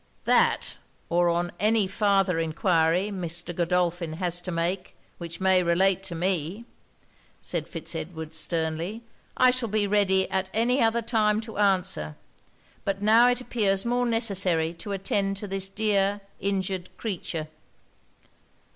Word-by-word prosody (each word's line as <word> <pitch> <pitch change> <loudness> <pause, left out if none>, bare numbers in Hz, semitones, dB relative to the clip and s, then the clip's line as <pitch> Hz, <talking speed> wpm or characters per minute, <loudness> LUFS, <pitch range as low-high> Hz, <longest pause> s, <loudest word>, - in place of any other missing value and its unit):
'That, - - +2 0.3
or 175 0 +1
any 215 +1 +3
farther 195 -3 +1
enquiry 165 +3 +1
Mr. 175 -2 -5
Godolphin 175 -1 0
has 175 +1 -2
to 180 - -6
make, 180 +2 -2 0.2
which 170 -1 -7
may 190 -1 +4
relate 185 +2 +2
to 175 -3 -7
me,' 180 +4 -2 0.8
said 165 -3 -3
Fitz 165 +1 -4
Edward 160 -1 -6
sternly, 165 +6 -2 0.3
'I 255 - +6
shall 250 -3 -1
be 210 0 +1
ready 195 -2 +2
at 190 0 -1
any 245 +4 +2
other 230 +1 +2
time 215 -2 +2
to 220 -2 -8
answer; 180 - +1 0.7
but 195 0 -2
now 225 +3 +6
it 245 0 0
appears 200 -5 0
more 245 +1 +1
necessary 190 -8 +1
to 175 +4 -8
attend 195 0 -1
to 205 - -6
this 195 0 -3
dear 205 -1 +1 0.2
injured 190 -2 -2
creature!' 170 -7 -4
190 Hz, 135 wpm, -26 LUFS, 170-210 Hz, 0.8 s, I